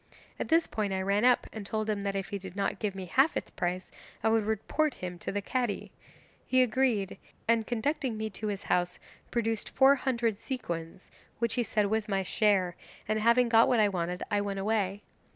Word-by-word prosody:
At - - -2
this 325 +1 +4
point 205 -3 -2
I 190 - -1
ran 200 +3 +1
up 250 -1 +4
and 220 - -5
told 215 +2 -2
him 210 -2 -1
that 200 0 -2
if 195 -1 -3
he 200 -2 -3
did 190 -1 -9
not 200 -1 -1
give 205 -3 -2
me 190 -1 -5
half 270 - +3
its - - -5
price 180 +1 -3 0.3
I 220 - +4
would 220 -1 +2
report 275 +7 0
him 180 -1 -6
to - - -4
the 200 0 -2
Cadi; 245 -2 -2 0.6
he 255 0 +5
agreed, 230 -5 0 0.3
and 230 -1 +2
conducting 245 0 -1
me 220 0 -3
to 215 - -5
his 200 -1 -3
house 180 0 0 0.3
produced 225 -2 -1
four 270 +1 +6
hundred 235 -6 0
sequins, 170 -9 -5 0.3
which 235 -1 0
he 245 - +1
said 210 -2 +1
was 215 +1 -1
my 195 -1 +1
share, 190 -3 +2 0.3
and 215 +1 +1
having 235 +3 +4
got 230 0 +6
what 245 - +3
I 210 -1 +5
wanted 180 -1 -2
I 205 0 +2
went 200 -1 -3
away. 200 -1 0
215 Hz, 205 wpm, -30 LUFS, 195-235 Hz, 0.6 s, four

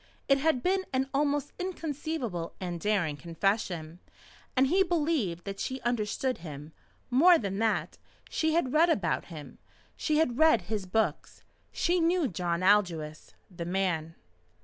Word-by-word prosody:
It 275 0 +4
had 275 -4 +1
been 380 +1 +1
an 265 0 0
almost 290 0 0
inconceivable 305 - -4
and 175 -2 -4
daring 190 -8 0
confession, 170 -1 -2 0.6
and 260 - +5
he 360 +8 +3
believed 300 - 0
that 195 0 -6
she 260 0 -3
understood 240 +2 -1
him. 150 -2 -9 0.4
More 335 +8 +7
than 200 -5 -3
that, 225 0 0 0.3
she 315 0 0
had 265 -7 +1
read 330 +3 +5
about 210 - 0
him. 155 -5 -10 0.4
She 305 -2 0
had 265 -5 +1
read 315 -8 +5
his 200 0 -4
books. 220 +4 -1 0.3
She 355 +1 +1
knew 335 -1 +2
John 175 -2 -2
Aldous 175 -6 +1 0.2
the 170 - -4
man. 175 -3 -1
220 Hz, 145 wpm, -29 LUFS, -, 0.6 s, More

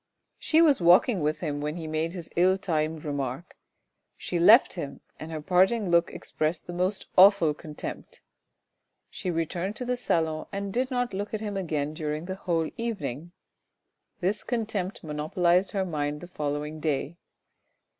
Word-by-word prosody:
She 320 +1 +4
was 290 - +4
walking 180 +5 +5
with 150 0 -1
him 145 -4 -3
when 150 +1 -3
he 165 -2 -6
made 160 +3 -2
his 170 -3 -7
ill 185 +2 +4
timed 155 -4 -2
remark; 140 +2 -4 0.6
she 175 - -3
left 215 +9 +7
him, 145 -6 -6 0.2
and 160 +1 -7
her 155 -2 -5
parting 190 +3 +3
look 170 0 +4
expressed 155 +1 -3
the 175 - -7
most 185 +3 -1
awful 190 -5 +7
contempt. 150 0 -8 0.9
She 185 - -4
returned 175 +4 -2
to 250 - -4
the 250 0 0
salon 160 -9 -1
and 200 -1 -4
did 255 +2 0
not 245 -3 -1
look 205 +3 -3
at - - -3
him 205 -2 -4
again 155 -6 -2
during 155 +1 -4
the 190 - -4
whole 170 -4 -1
evening. 175 - -4 0.9
This 190 +4 0
contempt 215 -6 -3
monopolised 170 +4 +1
her 195 -2 0
mind 150 -3 -3
the 175 - -8
following 150 -1 -4
day. 150 +2 -2
175 Hz, 160 wpm, -27 LUFS, 155-195 Hz, 0.9 s, left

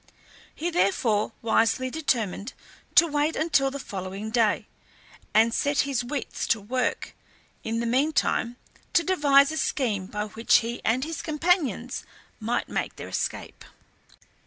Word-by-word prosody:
He 345 +3 -2
therefore 215 - +1
wisely 230 +3 +2
determined 235 - -1 0.4
to 335 - +8
wait 300 0 0
until 295 -4 +2
the 275 - -6
following 195 -3 -6
day, 220 -3 +2 0.7
and 225 +1 +4
set 285 +3 +2
his 275 -4 -1
wits 265 +1 -4
to 225 - +2
work 245 +5 -2 0.5
in 225 +1 -2
the - - -2
meantime 255 -1 +1 0.4
to 340 - +4
devise 285 -6 +4
a 315 - -4
scheme 210 -13 -1
by 210 0 -3
which 220 +2 +3
he 235 +1 -4
and 245 +4 +1
his 320 +2 -4
companions 300 - 0 0.4
might 235 +2 -1
make - - -3
their - - -8
escape. - - -4
250 Hz, 135 wpm, -26 LUFS, 220-290 Hz, 0.7 s, to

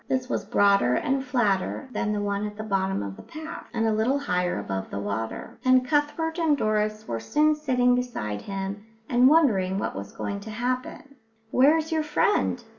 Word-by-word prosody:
This 260 -1 0
was - - -2
broader 200 -12 +3
and 270 0 0
flatter 240 -1 0
than 210 - -1
the 210 -1 -1
one 205 0 -1
at 210 0 -9
the 215 - -4
bottom 195 - -1
of 100 -1 -6
the - - -11
path, 315 +1 -9
and 225 -1 0
a 220 - +2
little 225 +6 +1
higher 180 - -1
above 95 -1 -4
the - - -5
water; 105 +3 -4
and 255 0 +4
Cuthbert 310 +4 0
and 315 -3 +3
Doris 215 -1 -1
were 115 - -2
soon 300 - +2
sitting 255 -5 +2
beside 170 - -2
him 195 +1 -5 0.2
and 245 +1 +5
wondering 205 - +3
what - - -3
was 100 +1 -6
going 200 - -4
to 210 +2 -9
happen. 255 +5 -4 0.3
"Where's 310 +5 +4
your 320 -1 +1
friend?" 305 +6 +1
220 Hz, 190 wpm, -26 LUFS, 195-275 Hz, 0.3 s, and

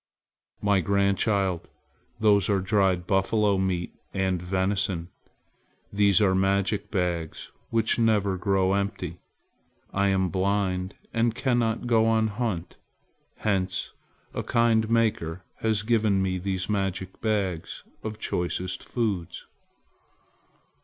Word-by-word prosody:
"My 100 -2 +3
grandchild, 100 -1 +1 0.5
those 105 -3 +4
are 100 -1 +3
dried 95 -2 +1
buffalo 100 +1 +2
meat 90 -2 -1 0.2
and 95 -2 0
venison. 95 -1 -1 0.8
These 100 -2 +4
are 100 -3 +3
magic 95 +1 +1
bags 85 -5 -2 0.2
which 115 0 +1
never 105 -4 +2
grow 95 0 +1
empty. 100 -4 -2 0.7
I 100 0 +2
am 95 -1 +2
blind 95 0 0 0.2
and 115 0 +1
cannot 120 -3 0
go 115 -2 +3
on 110 -1 +3
a - - -6
hunt. 100 -6 -3 0.6
Hence 95 -3 -1 0.4
a - - -2
kind 115 -2 +2
Maker 105 -7 0
has 110 -2 0
given 110 -3 +2
me 95 -1 0
these 95 0 -2
magic 95 -2 -2
bags 100 -7 -2 0.2
of 110 -1 -5
choicest 90 0 -2
foods." 105 -8 -3
100 Hz, 110 wpm, -26 LUFS, 95-110 Hz, 0.8 s, those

